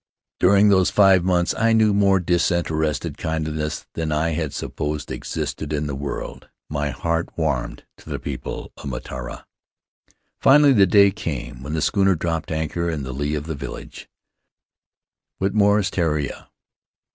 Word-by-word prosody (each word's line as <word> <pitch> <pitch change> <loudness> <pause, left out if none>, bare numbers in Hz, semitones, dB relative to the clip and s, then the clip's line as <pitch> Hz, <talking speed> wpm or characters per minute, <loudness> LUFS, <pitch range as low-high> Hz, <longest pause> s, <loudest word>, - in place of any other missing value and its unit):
"During 100 +3 +5
those 95 -2 +4
five 95 -3 +5
months 90 -1 +1
I 115 0 +2
knew 110 -2 +4
more 100 -1 +4
disinterested 85 -4 0
kindliness 80 -1 -3
than 80 -1 -2
I 75 +2 +1
had 80 -2 -2
supposed 75 0 -4
existed 80 -1 -4
in 75 0 -1
the 70 - -3
world; 70 +1 -6 0.2
my 75 -1 -1
heart 85 +3 -2
warmed 80 -2 -2
to - - -14
the - - -2
people 70 -3 -6
of - - -11
Mataora. - - -7 0.9
"Finally 145 0 +6
the 100 -5 +5
day 100 +1 +6
came 80 - -5
when 70 +3 -5
the 80 - 0
schooner 95 -2 +3
dropped 80 0 -3
anchor 80 +2 -2
in 75 -4 -3
the 65 0 -5
lee 75 +3 -2
of 75 0 -4
the 80 - -3
village 70 -3 -8 0.7
— 70 +1 -69
Whitmore's 100 0 +2
Tureia. 75 -5 -2
80 Hz, 150 wpm, -22 LUFS, 75-95 Hz, 0.9 s, Finally